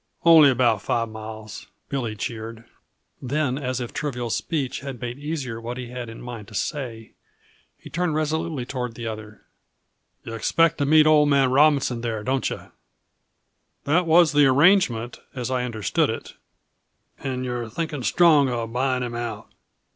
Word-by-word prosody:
"Only 160 -4 +8
about 120 -5 +2
five 115 +2 -1
miles," 110 -1 -9 0.2
Billy 120 -6 -3
cheered. 115 +1 -6 0.6
Then, 135 0 -1
as 130 -2 -2
if 120 -2 -6
trivial 125 -5 -3
speech 140 -3 -2
had 135 -2 -7
made 120 +2 -5
easier 140 -7 -4
what 120 +2 -5
he 125 -2 -6
had 125 -1 -6
in 115 - -10
mind 120 -4 -8
to 110 - -12
say, 115 -3 -4 0.6
he - - -13
turned 175 -2 -1
resolutely 155 -3 -1
toward 125 -3 -4
the 120 - -7
other. 110 -1 -7 0.8
"Yuh 115 - -7
expect 165 +9 +2
to 140 - +1
meet 155 +1 +6
old 150 -1 +5
man 135 -2 +3
Robinson 140 -4 +3
there, 110 -3 -3
don't 130 +2 0
yuh?" - - -8 1.1
"That 165 +4 +2
was 165 -1 +6
the 145 -1 +5
arrangement, 130 - +3 0.2
as 125 0 -3
I 125 -1 0
understood 110 -6 0
it" - - -5 0.9
"And 130 -1 -3
you're 120 -2 -3
thinking 150 +3 -4
strong 145 - +4
of 115 -2 -3
buying 130 0 0
him 120 -1 -4
out?" 120 -3 -5
125 Hz, 160 wpm, -24 LUFS, 115-145 Hz, 1.1 s, Only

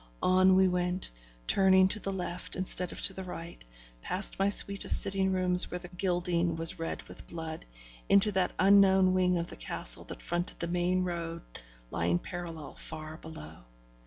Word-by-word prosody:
On 185 +1 +4
we 190 0 +5
went, 180 0 -2 0.3
turning 190 - +4
to 210 - -2
the 195 - -3
left 180 -2 -5
instead 185 -1 0
of - - -6
to 195 - +1
the 190 - -6
right, 170 - -9 0.4
past 190 - 0
my 195 +1 +2
suite 200 0 +4
of - - -8
sitting 190 -1 +2
rooms 180 -1 +4
where 180 - -4
the 175 0 -10
gilding 175 -2 -1
was 165 0 0
red 165 - -4
with - - -13
blood, 160 - -7 0.4
into 200 +1 +5
that 190 -2 0
unknown 190 -1 +5
wing 180 -1 +2
of 170 - -2
the - - -11
castle - - -2
that - - -9
fronted 175 +1 -3
the 170 - -2
main 180 +1 0
road 170 -2 -5 0.5
lying 85 +1 0
parallel 165 - -8
far 155 0 -8
below. 80 - -11
180 Hz, 175 wpm, -30 LUFS, 170-190 Hz, 0.5 s, we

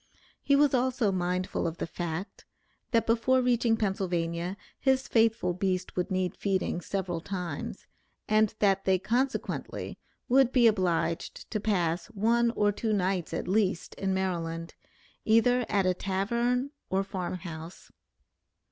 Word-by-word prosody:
He 280 - +3
was 285 -1 +4
also 250 -4 +2
mindful 180 -1 -1
of 165 0 -4
the - - -2
fact, 170 +2 -5 0.4
that, 230 -2 +2
before 235 +3 +3
reaching 240 -2 +2
Pennsylvania, 180 -3 -1 0.2
his 265 -1 +2
faithful 225 -5 +2
beast 185 0 -2
would 180 - -1
need 185 -1 -1
feeding 190 -3 -1
several 180 -3 -3
times, 175 - -5 0.4
and 215 0 +3
that 195 -2 +2
they 190 -1 +4
consequently 250 +8 -2 0.3
would 260 0 +4
be 250 -3 +4
obliged 175 -5 0
to 215 - -1
pass 175 -5 0
one 230 +2 +2
or 205 0 +3
two 215 +2 -1
nights 185 -3 0
at 165 - -3
least 190 -2 0
in 195 -1 -2
Maryland, 170 -3 -2 0.5
either 240 +2 +3
at 200 -2 +2
a 185 - +3
tavern 235 +8 0 0.2
or 190 +1 +1
farm 185 -2 -4
house. 165 0 -9
195 Hz, 140 wpm, -29 LUFS, 180-230 Hz, 0.5 s, was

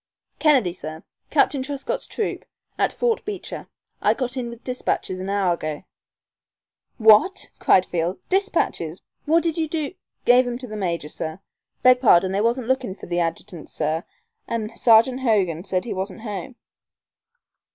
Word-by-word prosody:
"Kennedy, 265 - +4
sir. 160 -2 -8 0.3
Captain 275 - +2
Truscott's 275 +1 -4
troop, 435 - -3 0.3
at - - +1
Fort 470 -2 0
Beecher. 410 -3 -6 0.3
I - - +3
got 255 -1 -3
in 245 -2 -3
with 235 0 -11
despatches 250 -7 -2
an 190 +1 -4
hour 195 -3 +2
ago 155 -2 -5 0.6
" - - -57 0.2
"What!" 380 - +1
cried 185 - +4
Field. 175 +1 -2
"Despatches! 340 - 0 0.3
What 330 +2 +4
did 330 -1 -1
you 320 - 0
do 310 0 -3 0.2
" - - -49
"Gave 245 +1 +6
'em 240 0 -3
to 255 - -8
the 215 - -7
major, 170 -6 -2
sir. 160 +2 -5 0.4
Beg 255 0 +6
pardon; 190 -6 +5
they 195 +1 0
was 235 +3 +2
lookin' 255 -4 -1
for - - -11
the 175 0 -1
adjutant, 170 0 -4
sir, 160 +2 -2 0.4
an' 230 -1 -3
Sergeant 235 +3 +5
Hogan 195 -10 +1
said 185 0 -1
he 235 - -3
wasn't 190 +3 -5
home." 220 +3 -6
225 Hz, 160 wpm, -23 LUFS, 180-260 Hz, 0.6 s, Gave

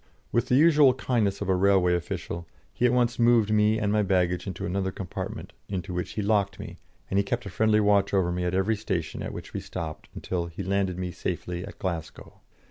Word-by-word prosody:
With 120 - +1
the 125 - +3
usual 150 -3 +6
kindness 115 -7 0
of 100 - -2
a 95 - +3
railway 95 -1 +4
official, 85 -1 -4 0.3
he 125 - +2
at - - +2
once 120 -1 +1
moved 115 -3 +4
me 105 +1 +3
and 105 -2 0
my 105 - +3
baggage 90 -2 +1
into 95 -3 -4
another 95 +1 -1
compartment, 95 -2 -6 0.2
into 90 -2 -4
which 90 0 -3
he 105 - -2
locked 100 -1 +1
me, - - -8 0.3
and 95 - +3
he - - +3
kept 120 +3 -3
a 100 - -6
friendly 110 +3 +3
watch 100 -1 +3
over 95 -3 +2
me 90 0 -2
at 90 +1 -1
every 95 +4 +2
station 95 -5 -3
at - - -4
which - - -9
we - - -2
stopped 80 -4 -6
until 85 -2 -3
he 85 +4 -6
landed 95 -1 0
me 90 -1 -3
safely 90 0 -4
at 100 - -9
Glasgow. 85 -4 -5
100 Hz, 215 wpm, -27 LUFS, 90-110 Hz, 0.3 s, usual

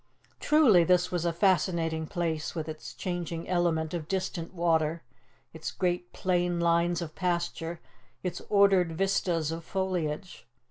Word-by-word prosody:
Truly 265 - +5
this 180 +1 +3
was 175 -2 -1
a 170 - +2
fascinating 165 -3 +1
place, 160 -2 -2
with 160 -2 -3
its 155 -1 -7
changing 175 -2 -4
element 170 -3 0
of 165 -3 -4
distant 185 -3 -3
water, 165 -2 +1 0.5
its 160 0 -5
great 175 -1 -2
plain 175 -1 0
lines 170 0 +2
of 155 -2 -8
pasture, 170 -2 -2 0.4
its 180 - -3
ordered 195 -4 +4
vistas 170 -3 0
of 165 0 -5
foliage! 180 -6 -3
175 Hz, 135 wpm, -29 LUFS, 165-180 Hz, 0.5 s, Truly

